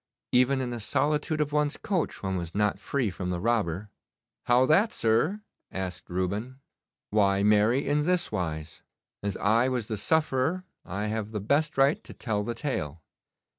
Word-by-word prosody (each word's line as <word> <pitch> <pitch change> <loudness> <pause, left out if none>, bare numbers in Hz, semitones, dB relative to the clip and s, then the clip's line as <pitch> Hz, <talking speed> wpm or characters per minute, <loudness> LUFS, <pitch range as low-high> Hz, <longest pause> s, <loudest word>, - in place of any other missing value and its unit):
Even 125 +2 +3
in 125 -1 -2
the 120 - -4
solitude 150 +7 0
of 150 -1 -1
one's 150 0 +1
coach 185 - -2
one 95 -1 -1
was 85 -1 -5
not 105 -2 +1
free 120 -1 -1
from 90 0 -4
the 90 -1 -1
robber.' 105 -2 0 0.6
'How 125 +1 +5
that, 195 - +4
sir?' 145 - +1 0.3
asked 95 -1 -5
Reuben. 100 +8 -2 0.5
'Why 100 -2 +3
marry, 105 +6 +3
in 150 +1 +2
this 180 +2 +1
wise. 80 -3 -4 0.4
As 100 -2 -2
I 115 +5 +3
was 125 -4 -1
the 110 - -2
sufferer 155 - +1 0.2
I 100 +3 -4
have 110 0 -2
the 105 - -1
best 140 +10 +1
right 140 +3 +3
to - - -11
tell 105 -3 -2
the 115 +3 -3
tale. 80 - -3
115 Hz, 170 wpm, -28 LUFS, 100-140 Hz, 0.6 s, How